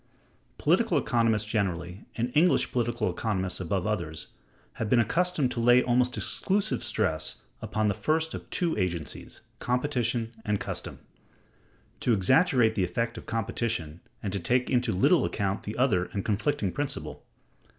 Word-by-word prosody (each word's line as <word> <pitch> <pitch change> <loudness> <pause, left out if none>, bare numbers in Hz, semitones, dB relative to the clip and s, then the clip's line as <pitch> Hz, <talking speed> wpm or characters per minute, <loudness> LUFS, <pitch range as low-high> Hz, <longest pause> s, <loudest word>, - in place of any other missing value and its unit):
Political - - +2
economists 115 -3 +2
generally, 95 -3 -2
and 120 +2 -1
English 170 +4 +3
political 120 -1 0
economists 95 -5 -2
above 95 +1 -1
others, 85 -7 -3 0.5
have 110 - -1
been 125 - +4
accustomed 155 - +1
to 120 - -3
lay 120 +2 +5
almost 125 0 +2
exclusive 200 +2 0
stress 85 -8 -1 0.3
upon 110 0 -1
the 100 - +2
first 160 +10 0
of - - -7
[two] 170 -3 0
agencies 85 -5 -4 0.2
[competition 120 -3 0
and 105 -2 0
custom]; - - -5 1.0
to 120 - +2
exaggerate 120 - +4
the 100 - 0
effect 115 +7 -1
of - - -9
competition, 110 -7 -2 0.2
and 100 -2 -2
to 100 - 0
take 125 +8 +1
into 125 -2 +2
little 90 - +4
account 100 0 -1
the 105 - -6
other 110 -9 +2
and 100 0 -5
conflicting 105 0 0
principle. 130 - -4
110 Hz, 145 wpm, -28 LUFS, 95-125 Hz, 1.0 s, lay